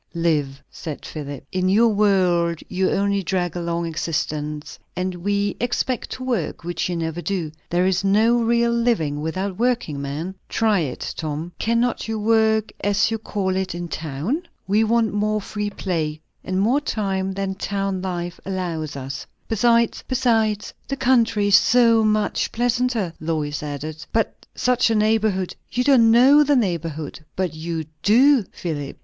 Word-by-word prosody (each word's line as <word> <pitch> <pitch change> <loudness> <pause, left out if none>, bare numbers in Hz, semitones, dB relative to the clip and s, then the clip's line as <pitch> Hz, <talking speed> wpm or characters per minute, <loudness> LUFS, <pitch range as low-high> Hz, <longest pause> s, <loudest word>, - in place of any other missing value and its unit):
"Live," 150 -5 0
said 155 -3 -7
Philip. 145 -3 -7
"In 185 0 +1
your 225 +4 +5
world 180 -5 +2
you 185 0 0
only 200 0 +1
drag 180 -2 -1
along 170 -1 -2
existence. 150 -2 -3 0.2
And 180 +1 -2
we 200 +3 -1
expect 245 +1 -1
to 255 - -7
work, 240 -13 -2
which 175 +1 -2
you 175 - -1
never 165 0 -3
do. 175 -5 -2 0.2
There 175 +1 +2
is 190 +1 +1
no 215 +4 +4
real 235 +1 +2
living 225 -12 +1
without 185 +5 -3
working, 235 - 0
man. 150 +7 -4 0.2
Try 220 -3 +2
it, 145 -7 -3
Tom." 155 +2 -4
"Cannot 235 +1 0
you 220 0 -2
work, 220 0 +2
as 205 +2 +2
you 225 - -1
call 195 -3 -2
it, 190 -1 -2
in 175 0 -4
town?" 160 - -3 0.3
"We 210 +3 +3
want 225 -1 +2
more 215 +1 +1
free 210 0 -4
play, 160 -6 -2 0.2
and 185 0 -1
more 240 +9 +2
time, 195 -7 -1
than 195 0 -2
town 195 -1 -2
life 175 -2 -4
allows 170 -6 -3
one." 135 -1 -5 0.4
"Besides, 230 +1 +2 0.8
the 275 - -3
country 235 -6 +3
is 200 - +7
so 230 -2 +5
much 215 -1 +1
pleasanter," 240 -5 0
Lois 155 -2 -2
added. 150 +1 -5
"But 225 -1 -1
such 250 -1 +2
a 225 - +2
neighbourhood! 210 -3 +1 0.2
you 250 - 0
don't 250 -4 +5
know 265 +6 +7
the 290 0 +3
neighbourhood 165 - -2
but 185 -4 -1
you 160 0 -4 0.2
do, 260 +5 +5
Philip. 145 -5 -5
190 Hz, 155 wpm, -22 LUFS, 165-225 Hz, 0.8 s, is